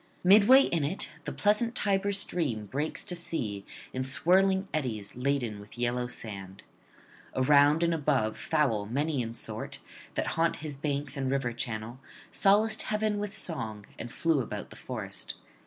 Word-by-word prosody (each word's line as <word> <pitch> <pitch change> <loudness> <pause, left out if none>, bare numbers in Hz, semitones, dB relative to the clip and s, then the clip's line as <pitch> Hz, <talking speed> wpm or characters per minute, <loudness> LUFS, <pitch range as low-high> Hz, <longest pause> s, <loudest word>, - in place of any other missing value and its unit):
Midway 210 +8 +8
in 165 - 0
it 160 +8 -1
the - - -3
pleasant 215 +3 +2
Tiber 200 -2 +1
stream 160 - -1
breaks 140 +9 -1
to 180 - -3
sea 115 - -4 0.3
in 130 - -1
swirling 190 +8 +3
eddies, 115 -9 -3
laden 125 -4 -1
with 105 +3 -12
yellow 120 0 0
sand. 100 -5 -6 0.7
Around 145 +4 +5
and 170 0 +2
above 140 -8 +1
fowl 110 -9 0
many 140 +4 0
in 115 0 -5
sort, - - -3 0.4
that - - 0
haunt 165 0 +2
his 150 -2 -5
banks 140 -1 -2
and 135 -1 -1
river 135 -3 0
channel, 115 0 -4 0.3
solaced 215 +2 +4
heaven 210 -1 0
with 205 -1 -3
song 110 - -3
and 120 - -6
flew 165 -4 +1
about 105 -3 -6
the - - -10
forest. - - -6
140 Hz, 155 wpm, -29 LUFS, 120-180 Hz, 0.7 s, Midway